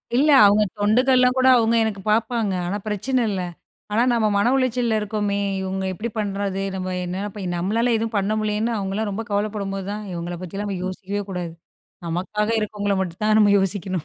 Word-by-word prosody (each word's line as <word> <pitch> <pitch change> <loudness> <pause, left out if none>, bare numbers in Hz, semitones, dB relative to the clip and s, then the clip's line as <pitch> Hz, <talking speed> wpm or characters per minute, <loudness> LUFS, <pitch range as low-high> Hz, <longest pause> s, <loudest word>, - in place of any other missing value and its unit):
இல்ல, 285 +5 +4 0.2
அவங்க 205 +1 +5 0.2
தொண்டுகள்லாம் 250 +4 +3
கூட 260 0 +4
அவங்க 230 0 +2
எனக்கு 210 -3 -3
பார்ப்பாங்க. 225 -1 +1
ஆனா, 195 +4 -2
பிரச்சனை 245 +5 0
இல்ல. 190 -3 -2 0.5
ஆனா, 220 - +2
நம்ம 220 -2 +2
மன 205 +5 +3
உளைச்சல்ல 245 -4 +1
இருக்கோமே, 205 -1 -1 0.2
இவங்க 190 0 -3
இப்படி 220 +6 -4
பண்ணுறது, 200 -1 -2
நம்ம 185 -1 -3
என்ன 185 +3 -3
போய் 195 -3 -4
நம்மளால 225 +7 +1
எதுவும் 225 0 -3
பண்ண 200 +2 0
முடியலேன்னு, 215 +2 -1
அவங்களலாம் 200 +2 -2
ரொம்ப 225 +3 -4
கவலைப்படும்போது 200 -2 -2
தான், 210 0 -5
இவங்களை 175 +1 -5
பத்தியெல்லாம் 200 +3 -4
நம்ம 185 -2 -4
யோசிக்கவே 195 +2 -4
கூடாது, 175 -2 -4 0.6
நமக்காக 200 +6 -2
இருக்கறவங்களை 205 -1 -1
மட்டும் 175 +1 -6
தான் 215 0 +4
நம்ம 205 -1 +5
யோசிக்கணும். 190 -3 -2
205 Hz, 170 wpm, -22 LUFS, 195-220 Hz, 0.6 s, அவங்க